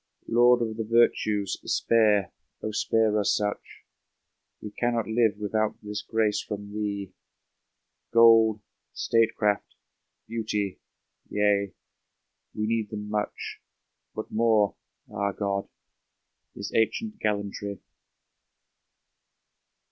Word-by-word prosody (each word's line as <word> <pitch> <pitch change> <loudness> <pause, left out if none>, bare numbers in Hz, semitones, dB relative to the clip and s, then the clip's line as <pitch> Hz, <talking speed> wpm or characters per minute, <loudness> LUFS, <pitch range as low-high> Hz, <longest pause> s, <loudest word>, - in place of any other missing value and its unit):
Lord 120 +1 +5
of 110 -1 -4
the 115 - -1
virtues, 110 -3 +2
spare, 105 -4 +2 0.4
spare 110 0 +2
us 105 - +2
such! 105 0 -4 0.8
We 105 - -8
cannot 120 0 0
live 110 -2 +2
without 105 +1 -1
this 105 0 -4
grace 110 -2 0
from 105 -1 -7
thee; 100 -3 -3 1.0
Gold, 115 -2 +6 0.3
statecraft, 110 -2 +1 0.5
beauty 105 -4 -2 0.3
— - - -41
^yea, 100 -1 +1 0.8
we 105 - -1
need 110 -1 -1
them 105 -1 -6
much, 105 -1 -3 0.5
But 110 - -6
more 110 -2 +3 0.2
— - - -51
^ah, 100 -1 -3
God! 100 -1 -2 0.5
— - - -30
^this - - -5
ancient 215 - 0
gallantry! 100 -1 -2
105 Hz, 100 wpm, -27 LUFS, 105-115 Hz, 1.0 s, Gold